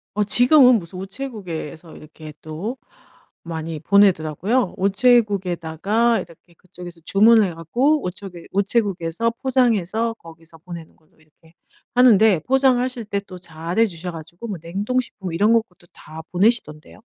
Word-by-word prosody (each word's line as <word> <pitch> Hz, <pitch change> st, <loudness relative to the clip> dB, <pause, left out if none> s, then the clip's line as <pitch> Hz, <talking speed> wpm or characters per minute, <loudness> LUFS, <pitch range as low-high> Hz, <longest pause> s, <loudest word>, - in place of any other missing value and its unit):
어 210 Hz, -, +1 dB
지금은 250 Hz, +4 st, +6 dB
무슨 180 Hz, -1 st, -9 dB
우체국에서 190 Hz, -, -7 dB
이렇게 155 Hz, 0 st, -12 dB
또 170 Hz, +11 st, -6 dB, 0.7 s
많이 160 Hz, -1 st, -6 dB
보내더라고요. 195 Hz, -, +1 dB
우체국에다가 200 Hz, -1 st, +1 dB
이렇게 170 Hz, +1 st, -13 dB
그쪽에서 175 Hz, -1 st, -13 dB
주문을 220 Hz, +2 st, +5 dB
해 175 Hz, -, -6 dB
갖고 255 Hz, -, 0 dB
우체국 180 Hz, 0 st, -7 dB
우체국에서 200 Hz, 0 st, -1 dB
포장해서 230 Hz, -4 st, 0 dB
거기서 165 Hz, -3 st, -16 dB
보내는 170 Hz, -1 st, -11 dB
걸로 155 Hz, -, -33 dB
이렇게 160 Hz, +1 st, -26 dB, 0.4 s
하는데 220 Hz, -6 st, +5 dB
포장하실 255 Hz, -2 st, +1 dB
때 200 Hz, -1 st, -3 dB
또 185 Hz, -2 st, -12 dB
잘 170 Hz, +2 st, -5 dB
해 230 Hz, -, +5 dB
주셔 175 Hz, 0 st, -7 dB
가지고 165 Hz, +6 st, -10 dB
뭐 200 Hz, -, -4 dB
냉동식품 195 Hz, +1 st, -4 dB
이런 205 Hz, +6 st, +2 dB
것들도 190 Hz, -6 st, -2 dB
다 160 Hz, +1 st, -11 dB
보내시던데요. 180 Hz, -6 st, -1 dB
190 Hz, 345 characters per minute, -21 LUFS, 165-230 Hz, 0.7 s, 지금은